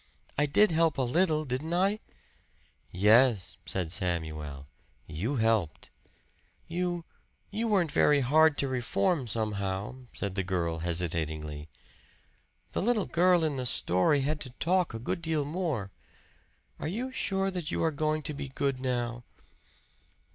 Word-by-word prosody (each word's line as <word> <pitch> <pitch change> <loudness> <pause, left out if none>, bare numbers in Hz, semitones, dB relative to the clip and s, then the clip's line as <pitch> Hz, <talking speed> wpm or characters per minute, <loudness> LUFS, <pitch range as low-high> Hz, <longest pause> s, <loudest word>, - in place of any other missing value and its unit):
I 150 +1 +2
did 205 +7 +4
help 165 -1 +2
a 135 - +1
little, 155 +4 +1
didn't 145 +6 -2
I?" 195 +4 +2 0.9
"Yes," 105 +1 +4
said 90 -4 -1
Samuel. 80 -6 -3 0.4
"You 95 - -3
helped." 110 - 0 0.8
"You 175 0 -2 0.5
you 220 +3 -1
weren't 190 -8 +2
very 145 -1 +4
hard 155 +4 +4
to 140 - 0
reform, 125 - 0
somehow," 105 +3 -3
said 100 -2 -4
the 95 0 -1
child 85 -3 -1
hesitatingly. 80 -3 -2 1.0
"The - - -1
little 220 -1 +1
girl 175 0 +3
in 150 -3 0
the 125 -1 -2
story 110 - +2
had 150 +3 -1
to 135 - -5
talk 180 -3 +1
a - - -2
good 120 +8 -3
deal 160 -3 0
more. 150 - -2 0.9
Are - - -3
you 240 +10 -3
sure 195 -5 -1
that 175 -4 -4
you - - -1
are 160 - +2
going 155 +1 -1
to 150 - -3
be 140 -1 -6
good 135 -1 -1
now?" 120 -2 -2
135 Hz, 140 wpm, -29 LUFS, 100-165 Hz, 1.0 s, did